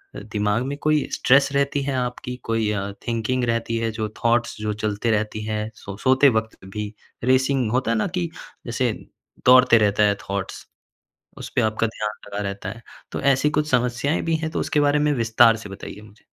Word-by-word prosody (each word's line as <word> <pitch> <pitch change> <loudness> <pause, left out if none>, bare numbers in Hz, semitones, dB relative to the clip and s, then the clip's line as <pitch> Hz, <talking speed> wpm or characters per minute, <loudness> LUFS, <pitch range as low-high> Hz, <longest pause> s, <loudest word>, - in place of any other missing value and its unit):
दिमाग 105 +2 -1
में 140 +1 -4
कोई 155 -1 +2
स्ट्रेस 140 +1 +4
रहती 140 0 +1
है 135 0 -2
आपकी, 125 0 -3
कोई 115 -2 0
अ, 100 -1 -2 0.2
थिंकिंग 120 +2 -1
रहती 115 0 -1
है 115 0 -1
जो 110 -1 -3
थॉट्स 120 0 +2
जो 105 0 -1
चलते 105 +2 0
रहती 110 0 -1
है, 110 0 -2
सो 100 0 -9
सोते 130 +4 +5
वक़्त 110 0 -3
भी 105 +2 -5 0.3
रेसिंग 130 -1 +2
होता 125 -1 +1
है 115 - +1
ना 110 - +1
कि 170 -1 -2 0.4
जैसे 120 0 0 0.5
दौड़ते 125 -1 +7
रहता 105 -1 +3
है 100 -1 +3
थॉट्स, 100 -1 -4 0.7
उसपे - - -2
आपका 110 +1 +1
ध्यान 110 -1 -3 0.2
लगा 100 - -5
रहता 100 -1 -5
है? 110 +4 -8 0.3
तो - - -3
ऐसी 140 +2 +3
कुछ 150 0 0
समस्याएँ 125 +4 +1
भी 165 - 0
हैं 160 0 -3
तो - - -2
उसके 150 - +1
बारे 145 0 +3
में 150 0 +2
विस्तार 115 -2 +4
से 115 -2 -9
बताइए 100 +1 -9
मुझे? 105 0 -18
115 Hz, 190 wpm, -23 LUFS, 105-130 Hz, 0.7 s, दौड़ते